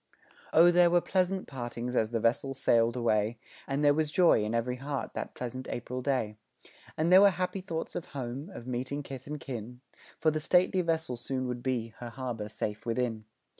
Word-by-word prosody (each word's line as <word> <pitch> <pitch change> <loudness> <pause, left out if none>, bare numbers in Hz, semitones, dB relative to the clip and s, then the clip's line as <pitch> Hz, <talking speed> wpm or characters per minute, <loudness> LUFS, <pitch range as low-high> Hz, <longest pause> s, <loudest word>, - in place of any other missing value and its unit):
O 170 +2 +7
there 175 0 +6
were 175 +1 +5
pleasant 185 +1 0
partings 120 -1 -5
as 110 -2 +2
the 115 0 -1
vessel 120 +4 +1
sail'd 115 -2 +3
away, 115 -2 +1 0.3
And 140 +2 0
there 145 - +6
was 155 0 0
joy 170 - +5
in 110 +2 -1
every 125 +2 -1
heart 140 +1 -4
that - - -5
pleasant 125 +1 -5
April 125 +1 -4
day, 125 -6 -1 0.6
And 165 +3 +3
there 190 - +10
were 200 - +8
happy 185 +1 -2
thoughts 165 -3 -4
of - - -3
home 135 +4 -5
of 120 -9 -9
meeting 130 +3 -3
kith 135 -1 -8
and 150 0 -4
kin, 125 -1 -7 0.4
For 160 - +3
the 155 - -1
stately 180 +3 +3
vessel 160 -7 -1
soon 130 +2 -3
would 125 -1 -4
be 120 -3 -1
her 120 - -6
harbor 115 -4 -5
safe 105 0 -4
within. 115 -2 -1
130 Hz, 195 wpm, -30 LUFS, 120-155 Hz, 0.6 s, there